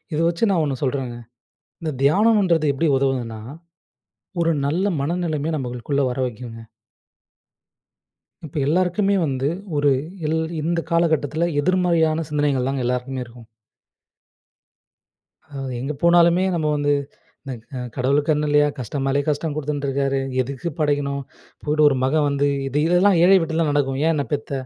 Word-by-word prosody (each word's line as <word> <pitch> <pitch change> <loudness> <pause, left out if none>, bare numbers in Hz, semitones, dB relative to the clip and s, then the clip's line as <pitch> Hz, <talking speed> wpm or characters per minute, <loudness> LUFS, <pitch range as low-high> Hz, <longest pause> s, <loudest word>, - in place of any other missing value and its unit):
இத 150 - -1
வச்சு 170 +6 +1
நான் 175 -5 +2
1 140 -3 -2
சொல்றேங்க 130 -3 -2 0.7
இந்த 160 - -2
தியானம்ன்றது 185 +1 +3
எப்படி 160 +4 0
உதவுதுன்னா? 125 -5 -1 1.0
ஒரு 165 0 +2
நல்ல 170 +7 0 0.2
மனநிலைமைய 160 0 -1
நம்மளுக்குள்ள 125 +2 -2
வர 125 - -4
வைக்குங்க. 115 -1 -7 1.9
இப்போ 150 - -6
எல்லாருக்குமே 185 +5 +2
வந்து 135 -2 -1 0.3
ஒரு 145 -1 +3 0.4
எல் 160 +1 0 0.2
இந்த 165 +2 0
காலகட்டத்தில 160 -1 +1
எதிர்மறையான 170 -3 +2
சிந்தனைகள் 145 -3 0
தாங்க 135 -2 -2
எல்லாருக்குமே 125 +1 -2
இருக்கும். 120 -1 -15 2.1
ம், 135 -1 -4
எங்கே 140 +4 -3
போனாலுமே 170 +1 +5
நம்ம 160 -3 -1
வந்து 145 0 +1 0.5
"இந்த 135 - -5 0.4
கடவுளுக்கு 140 +4 +1
கண்ணு 150 0 +1
இல்லயா? 145 0 +4
கஷ்டமாலயே 135 +3 -1
கஷ்டம் 150 +1 -1
கொடுத்துன்டுருக்காரு. 140 -2 -1 0.2
எதுக்கு 135 +5 -3
படைக்கணும்? 145 -2 0 0.4
போயிட்டு 150 +1 +1
ஒரு 135 - 0
மகன் 145 +3 +2
வந்து, 140 0 +1 0.2
இது 135 +2 -1
இதெல்லாம் 180 +2 +4
ஏழை 190 +2 +7
வீட்ல 165 0 0
நடக்கும். 135 -2 0
ஏன் 165 - +3
என்னை 145 -3 -1
பெத்த? 145 0 -3
145 Hz, 130 wpm, -22 LUFS, 135-165 Hz, 2.1 s, ஏழை